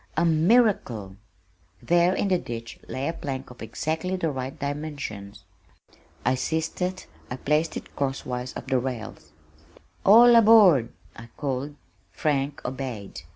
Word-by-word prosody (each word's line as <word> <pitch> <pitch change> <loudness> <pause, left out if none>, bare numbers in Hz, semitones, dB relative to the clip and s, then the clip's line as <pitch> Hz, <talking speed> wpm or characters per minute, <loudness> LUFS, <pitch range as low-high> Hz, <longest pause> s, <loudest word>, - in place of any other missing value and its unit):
A 170 - +3
miracle! 160 - +2 0.6
There 175 +2 +3
in 200 - 0
the 185 -2 +2
ditch 115 -4 -7
lay 130 +2 -3
a 165 - -1
plank 135 -5 -6
of 125 - -14
exactly 160 +10 -3
the 165 -4 -1
right 130 0 -5
dimensions. 140 -9 -6 0.8
I - - +3
seized 160 +7 -2
it, 185 +1 -2 0.2
I 125 - -4
placed 150 +4 0
it - - -10
cross 140 -1 -2
wise 125 0 -4
of - - -7
the 130 - +1
rails. 115 - -6 0.7
"All 235 +4 +8
aboard," 210 - +6 0.2
I 115 0 -11
called. 140 0 -3 0.3
Frank 145 -1 -2
obeyed. 125 -6 -5
140 Hz, 140 wpm, -25 LUFS, 125-170 Hz, 0.8 s, All